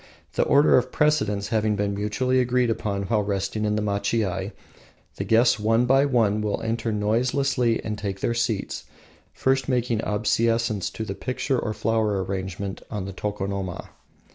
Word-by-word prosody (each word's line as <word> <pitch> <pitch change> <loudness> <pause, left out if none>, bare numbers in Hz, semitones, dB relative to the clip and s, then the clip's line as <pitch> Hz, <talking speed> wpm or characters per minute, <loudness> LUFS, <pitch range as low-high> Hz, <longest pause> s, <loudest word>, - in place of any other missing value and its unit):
The - - +1
order 140 -2 +5
of 125 +1 -5
precedence 105 -10 +1
having 110 -1 +1
been 100 0 -1
mutually 115 +6 0
agreed 125 -1 +2
upon 100 -3 -2
while 105 +2 +1
resting 100 +1 -2
in 105 0 +1
the 105 - -1
machiai, 100 -2 -1 0.7
the - - -2
guests 115 0 +4
one 115 +3 +2
by 135 +3 +4
one 110 -5 +2
will 105 -1 -1
enter 115 0 -1
noiselessly 120 +3 +1
and 105 -1 -4
take 100 -2 -4
their 115 - 0
seats, 115 -3 -2 0.5
first 135 0 0
making 120 -3 0
obeisance 115 0 +1
to 110 - -5
the 100 - -4
picture 130 +4 -2
or 110 -1 -3
flower 105 -2 0
arrangement 95 0 -4
on 105 -4 -4
the 95 - -6
tokonoma. 100 -2 -4
110 Hz, 160 wpm, -24 LUFS, 100-120 Hz, 0.7 s, order